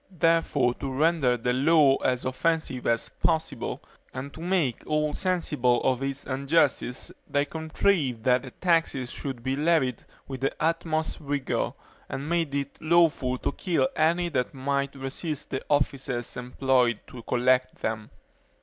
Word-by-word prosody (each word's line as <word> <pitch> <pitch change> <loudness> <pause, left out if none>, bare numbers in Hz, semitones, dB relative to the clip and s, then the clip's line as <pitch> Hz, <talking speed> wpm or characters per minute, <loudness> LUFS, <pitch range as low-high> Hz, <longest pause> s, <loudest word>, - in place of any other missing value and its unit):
Therefore, 165 -7 +2
to 135 - -3
render 140 -3 +2
the 125 +1 0
law 140 0 +5
as 125 -1 0
offensive 135 -1 -1
as 115 -1 +1
possible, 160 -6 -2 0.3
and 135 +2 -5
to - - -11
make 170 - 0
all 150 -1 +1
sensible 150 -10 +1
of 130 -1 +1
its 135 0 -3
injustice, 140 -2 +1 0.2
they 145 0 +2
contrived 160 - 0
that 125 0 +3
the 130 - -9
taxes 165 -6 0
should 130 -4 -5
be 130 +1 0
levied 145 -5 +1 0.2
with 130 -2 -6
the 135 - 0
utmost 160 -1 0
rigor, 145 -2 -1 0.4
and 140 +2 -4
made 165 -4 0
it 140 -1 -3
lawful 155 -6 +3
to - - -2
kill 180 - +1
any 170 +3 +2
that 130 -4 -1
might 140 +1 -1
resist 140 +3 -5
the 130 - -2
officers 135 -4 -1
employed 125 -2 +1
to 125 - -10
collect 130 +2 +1
them. 110 -1 -2
140 Hz, 145 wpm, -27 LUFS, 130-160 Hz, 0.4 s, law